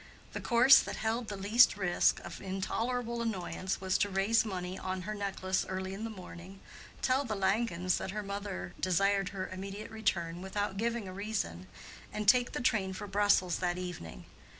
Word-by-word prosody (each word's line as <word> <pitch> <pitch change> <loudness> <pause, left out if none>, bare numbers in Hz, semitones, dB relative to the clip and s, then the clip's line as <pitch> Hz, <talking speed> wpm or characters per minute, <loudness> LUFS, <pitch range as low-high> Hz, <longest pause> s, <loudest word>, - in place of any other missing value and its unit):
The - - -4
course 250 +2 +7
that - - -3
held 225 +1 -1
the 205 - -5
least 205 +3 +5
risk 180 -3 +2
of - - -8
intolerable 235 +5 -2
annoyance 190 -3 -2
was 190 0 0
to 205 - +2
raise 195 +4 +3
money 185 -4 -4
on 185 0 -3
her 215 +3 -4
necklace 190 -2 -1
early 190 0 -3
in 210 +3 -5
the - - -3
morning, 185 -2 -10 0.4
tell 260 +2 +3
the 220 -5 -3
Langens 190 -2 +1
that - - -4
her 210 +2 -3
mother 200 - -5
desired 195 +2 +2
her 190 -2 -4
immediate 195 +3 -7
return 175 -6 -1
without 195 +1 -3
giving 230 -1 -1
a 185 - -7
reason, 190 - -3 0.4
and 210 -1 -4
take 245 +3 +5
the - - -2
train 200 -6 +1
for 190 - -6
Brussels 200 -3 +2
that 175 -1 0
evening. 170 - -7
195 Hz, 175 wpm, -32 LUFS, 185-220 Hz, 0.4 s, course